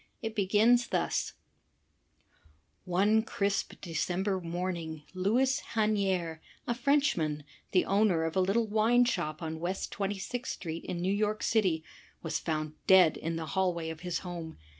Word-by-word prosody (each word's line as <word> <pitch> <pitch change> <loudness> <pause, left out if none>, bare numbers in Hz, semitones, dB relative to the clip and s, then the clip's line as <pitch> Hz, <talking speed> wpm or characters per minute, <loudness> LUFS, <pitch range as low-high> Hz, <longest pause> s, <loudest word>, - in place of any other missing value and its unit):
It 225 -1 -3
begins 220 +4 +3
thus: - - -1 1.5
One 200 +5 +3
crisp 200 -2 -1
December 185 +3 -1
morning 170 -2 -4
Louis 245 +9 +2 0.2
Hanier, 195 -7 +1 0.3
a 240 - 0
Frenchman, 235 - +1 0.3
the 185 - +3
owner 195 -4 +3
of 165 +1 -2
a 190 - +3
little 200 +5 +2
wine 220 +3 +3
shop 165 -9 -2
on 160 0 -4
West 180 +3 -3
Twenty 200 0 -2
sixth 245 +6 -4
street 165 -2 -6
in 175 -1 -3
New 190 +2 +1
York 210 +1 0
City, 185 -8 +2 0.4
was 165 - -1
found 155 -2 -2
dead 185 -4 +7
in 165 +1 -3
the 165 -1 -3
hallway 175 -4 0
of 160 - -8
his 180 -1 -2
home. 170 -2 -6
185 Hz, 145 wpm, -30 LUFS, 165-215 Hz, 1.5 s, dead